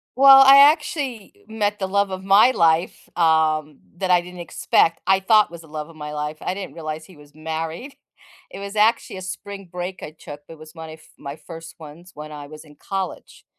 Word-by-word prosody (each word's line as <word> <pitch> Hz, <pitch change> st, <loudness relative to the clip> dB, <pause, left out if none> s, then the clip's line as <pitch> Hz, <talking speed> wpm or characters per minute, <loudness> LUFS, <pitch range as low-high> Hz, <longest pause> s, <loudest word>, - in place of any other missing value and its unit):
Well, 270 Hz, 0 st, +8 dB
I 275 Hz, +1 st, +8 dB
actually 270 Hz, -, -4 dB
met 210 Hz, -2 st, -2 dB
the 190 Hz, -, -2 dB
love 200 Hz, 0 st, 0 dB
of 185 Hz, 0 st, -5 dB
my 200 Hz, +6 st, +5 dB
life, 165 Hz, -3 st, 0 dB
um, 155 Hz, -3 st, +1 dB, 0.2 s
that 185 Hz, 0 st, -2 dB
I 180 Hz, -, +5 dB
didn't 180 Hz, 0 st, -10 dB
expect. 165 Hz, 0 st, +1 dB
I 190 Hz, 0 st, +3 dB
thought 215 Hz, 0 st, +4 dB
was 170 Hz, -1 st, -11 dB
the 160 Hz, -, -17 dB
love 155 Hz, +1 st, -7 dB
of 165 Hz, -, -16 dB
my 150 Hz, -1 st, -8 dB
life, 150 Hz, +1 st, -5 dB
I 180 Hz, -, -3 dB
didn't 195 Hz, -1 st, -8 dB
realize 155 Hz, -1 st, -6 dB
he 185 Hz, -, -17 dB
was 145 Hz, 0 st, -19 dB
married. 160 Hz, -, -6 dB, 0.6 s
It -, -, -10 dB
was 200 Hz, +1 st, -8 dB
actually 215 Hz, -2 st, +1 dB
a -, -, -8 dB
spring 195 Hz, +1 st, -8 dB
break 180 Hz, 0 st, -6 dB
I -, -, -7 dB
took, 145 Hz, -2 st, -12 dB
it 165 Hz, -, -11 dB
was 155 Hz, +1 st, -15 dB
my 160 Hz, -1 st, -9 dB
f 155 Hz, 0 st, -15 dB
my 140 Hz, +2 st, -8 dB
first 165 Hz, 0 st, -12 dB
ones 160 Hz, +4 st, -13 dB
when 150 Hz, +1 st, -10 dB
I 145 Hz, -1 st, -9 dB
was 155 Hz, +1 st, -13 dB
in 150 Hz, -, -18 dB
college, 190 Hz, +4 st, -7 dB
170 Hz, 210 wpm, -21 LUFS, 155-195 Hz, 0.6 s, Well